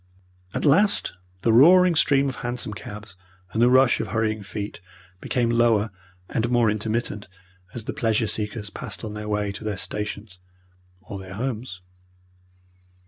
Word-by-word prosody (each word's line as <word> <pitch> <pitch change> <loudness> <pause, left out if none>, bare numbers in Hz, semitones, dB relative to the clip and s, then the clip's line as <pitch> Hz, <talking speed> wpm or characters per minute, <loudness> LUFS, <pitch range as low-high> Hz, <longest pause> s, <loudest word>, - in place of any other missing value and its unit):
At - - -1
last 200 +9 +3 0.3
the 115 - +3
roaring 180 +8 +7
stream 140 -3 +3
of 130 - -4
hansom 120 -3 -4
cabs 105 0 -9 0.4
and 110 - 0
the 120 - +6
rush 130 0 +5
of - - -2
hurrying 110 +1 -1
feet 100 -2 -6 0.4
became 120 +2 0
lower 115 -2 +3 0.4
and 115 +1 -1
more 120 -3 +3
intermittent 110 0 -3 0.5
as 120 - -4
the - - -4
pleasure 115 -5 +1
seekers 105 -1 -3
passed - - -5
on 110 -2 -5
their 105 0 -6
way 105 -1 0
to 100 - -8
their 105 -2 -3
stations 105 -1 -5 0.6
or 100 -1 -8
their 95 0 -9
homes. 115 -4 -4
110 Hz, 150 wpm, -24 LUFS, 105-120 Hz, 0.6 s, roaring